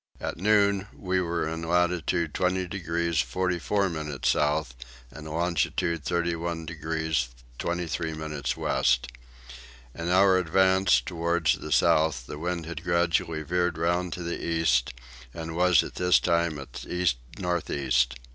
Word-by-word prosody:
At - - -4
noon 100 0 +3
we 95 -1 0
were 85 -2 -1
in 80 +1 -4
latitude 85 -1 0
20 90 0 0
degrees 85 -3 -1
44 90 +9 0
minutes 75 -6 -2
south 75 -3 +1 0.4
and 80 0 -10
longitude 85 0 -1
31 85 -1 -2
degrees 80 -4 -2 0.3
23 85 -2 -2
minutes 75 -2 -3
west. 65 0 +1 0.9
In 85 +1 -4
our 95 +1 +5
advances 95 -3 +3
towards 85 +3 0
the 75 - -7
south 75 -1 +3
the 75 - -7
wind 85 0 -3
had 85 +1 -6
gradually 85 -2 +1
veered 90 +1 0
round 85 +1 0
to 90 - -6
the 85 0 -4
east 80 -8 +1 0.4
and 80 0 -5
was 90 0 +4
at - - -8
this 90 0 +3
time 85 -2 +1
at 70 - -8
east 90 -7 +1 0.2
north 90 -2 -2
east. 65 -3 +1
85 Hz, 135 wpm, -27 LUFS, 80-90 Hz, 0.9 s, our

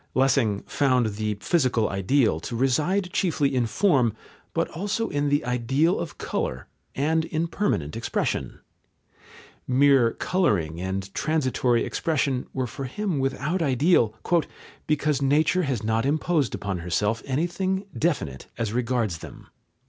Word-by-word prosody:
Lessing 130 -6 +2
found 125 -6 +1
the 105 -1 -1
physical 130 - +2
ideal 100 - +1
to 115 - -6
reside 160 - +1
chiefly 155 -7 +1
in 125 -3 +1
form, 125 - +2 0.4
but - - 0
also 205 +6 -2
in 145 0 0
the 145 -2 +1
ideal 135 +8 +1
of 165 - -5
colour, - - -3 0.3
and 160 +4 +1
in 165 0 -1
permanent 125 - -1
expression. 115 - -2 1.1
Mere 130 -2 +4
colouring 90 - 0
and 95 +1 -4
transitory 130 -6 +1
expression 140 -5 -1
were 130 -1 -2
for 135 +3 -6
him 180 +3 -2
without 140 +6 -1
ideal, 135 - +3 0.7
"because 150 -2 +1
nature 155 +6 +3
has 135 - -2
not 110 +1 +1
imposed 150 0 +1
upon 95 -3 -3
herself 105 +6 0
anything 185 +7 -1
definite 80 - -1
as 110 -2 -2
regards 120 -7 0
them." - - -12
135 Hz, 130 wpm, -25 LUFS, 115-160 Hz, 1.1 s, Mere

